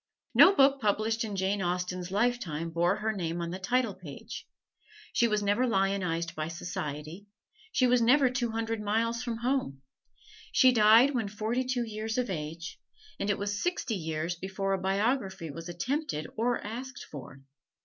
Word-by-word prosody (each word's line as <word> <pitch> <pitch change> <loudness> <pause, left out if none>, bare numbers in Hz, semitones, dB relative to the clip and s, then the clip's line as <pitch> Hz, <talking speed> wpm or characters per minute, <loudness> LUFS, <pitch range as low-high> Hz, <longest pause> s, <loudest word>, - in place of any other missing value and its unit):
No 390 - +8
book 275 -2 +5
published 220 +2 +1
in 210 -3 -4
Jane 195 +1 0
Austen's 180 0 -2
lifetime 190 -7 -1
bore 175 +3 +2
her 220 +1 -1
name 170 -4 -3
on 170 0 -3
the 185 - -5
title 245 +1 +1
page; 170 -7 -9 0.7
she 235 - +4
was 210 -2 0
never 205 +6 +2
lionized 190 -5 0
by 155 0 -3
society; 160 +2 -6 0.4
she 255 - +3
was 250 -1 +4
never 260 +4 +5
two 250 -1 -1
hundred 225 0 -2
miles 230 +3 0
from 235 -2 -3
home; 235 - -1 0.7
she 260 - +6
died 230 +4 +6
when 235 -5 -1
forty 220 +5 -1
two 255 -1 -1
years 220 0 -4
of 250 -4 0
age, 165 +1 -5 0.4
and 200 - -1
it 205 - +2
was 205 0 -2
sixty 350 -9 -1
years 160 -2 -2
before 195 +2 -2
a 195 - 0
biography 195 - 0
was 165 +4 -8
attempted 175 - -2
or 240 +2 +1
asked 250 +5 -6
for. 135 -2 -9
205 Hz, 165 wpm, -29 LUFS, 175-240 Hz, 0.7 s, No